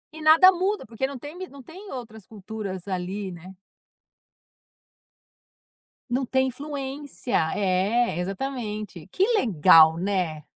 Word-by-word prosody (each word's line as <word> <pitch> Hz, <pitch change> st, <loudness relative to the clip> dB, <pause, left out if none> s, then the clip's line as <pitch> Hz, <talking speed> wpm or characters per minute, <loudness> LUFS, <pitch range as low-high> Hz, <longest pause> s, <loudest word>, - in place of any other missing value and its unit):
E 315 Hz, -, -9 dB
nada 320 Hz, +4 st, +7 dB
muda, 380 Hz, +4 st, -2 dB
porque 230 Hz, +4 st, -3 dB
não 275 Hz, -3 st, -8 dB
tem 295 Hz, +5 st, -9 dB
mi 375 Hz, 0 st, -6 dB
não 280 Hz, -1 st, -13 dB
tem 380 Hz, +9 st, -12 dB
outras 220 Hz, -5 st, -9 dB
culturas 205 Hz, -3 st, -7 dB
ali, 190 Hz, +1 st, -4 dB
né. 180 Hz, +2 st, -12 dB, 2.5 s
Não 255 Hz, +2 st, 0 dB
tem 260 Hz, +1 st, +1 dB
influência. 275 Hz, 0 st, -5 dB, 0.2 s
É, 200 Hz, +2 st, +1 dB
exatamente. 210 Hz, -, -5 dB
Que 375 Hz, -, +1 dB
legal, 165 Hz, -, +6 dB
né. 175 Hz, -5 st, -2 dB
220 Hz, 120 wpm, -25 LUFS, 185-275 Hz, 2.5 s, nada